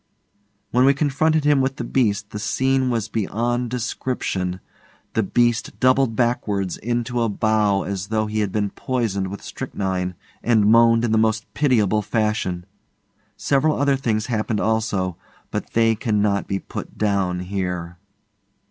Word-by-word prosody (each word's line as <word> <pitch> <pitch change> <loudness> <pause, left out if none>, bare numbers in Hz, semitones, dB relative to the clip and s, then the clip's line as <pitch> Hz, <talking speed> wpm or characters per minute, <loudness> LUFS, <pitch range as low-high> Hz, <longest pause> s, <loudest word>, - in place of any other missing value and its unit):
When 125 +2 +4
we 135 +1 +5
confronted 155 +2 +1
him 145 -2 +4
with 135 +1 0
the 125 - -5
beast 105 -4 0
the 105 - -5
scene 130 +4 +1
was 115 -3 -1
beyond 120 +3 -1
description. 115 -6 -2 0.5
The 110 - +2
beast 120 +3 0
doubled 130 -2 +3
backwards 105 -6 0
into 120 +1 -2
a 115 - +1
bow 105 -1 +1
as 100 -1 -4
though 110 +1 0
he 105 0 -2
had 105 -2 0
been 105 -1 -1
poisoned 110 -7 -2
with 100 +2 -7
strychnine, 90 -2 -3 0.3
and 110 -3 +3
moaned 115 +1 +5
in 115 - -1
the 110 - +3
most 110 0 +1
pitiable 110 -8 +2
fashion. 105 -5 -1 0.7
Several 145 +2 +1
other 140 -1 +3
things 115 -5 -1
happened 110 -2 -1
also, 105 -5 0 0.3
but - - -4
they 115 0 +4
cannot 105 -3 0
be 100 - -1
put - - -8
down 95 -4 0
here. 90 -2 -4
110 Hz, 150 wpm, -22 LUFS, 100-120 Hz, 0.7 s, we